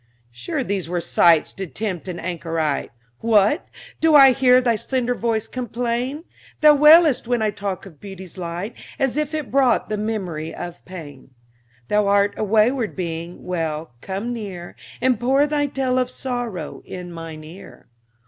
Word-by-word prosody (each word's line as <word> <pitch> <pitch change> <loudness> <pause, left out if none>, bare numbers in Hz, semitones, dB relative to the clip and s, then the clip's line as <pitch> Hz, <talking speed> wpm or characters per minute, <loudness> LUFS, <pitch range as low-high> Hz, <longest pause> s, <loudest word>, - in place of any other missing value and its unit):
Sure 120 0 -3
these 190 -3 -3
were 175 0 -1
sights 170 -1 +3
to 195 -1 -5
tempt 190 -1 -4
an 180 -2 -5
anchorite! 165 -4 -2 0.3
What! 220 - +3 0.3
do 320 -1 +4
I 270 -2 +9
hear 255 -1 +5
thy 240 -2 +2
slender 245 +2 -1
voice 225 -2 -1
complain? 245 +4 -3 0.4
Thou 300 -1 +8
wailest 300 -3 +6
when 240 -2 +1
I 215 - +1
talk 200 -2 -5
of 165 -7 -14
beauty's 190 -3 -10
light, 180 +4 -5 0.2
As 270 -3 0
if 300 0 -1
it 305 -4 -4
brought 260 -3 +2
the 215 - -1
memory 185 -8 -3
of 175 0 -8
pain. 150 -8 -10 0.6
Thou 210 -1 +2
art 200 0 +3
a - - -3
wayward 220 +3 +2
being 170 -1 -5
well, 160 -5 -3
come 200 +5 -4
near, 190 -7 -7 0.3
And 255 -3 +2
pour 265 +4 +3
thy 290 -1 0
tale 260 -2 0
of 250 -1 0
sorrow 245 - -4
in 180 -1 -8
mine 165 -2 -8
ear. 170 +5 -13
210 Hz, 160 wpm, -22 LUFS, 175-250 Hz, 0.6 s, I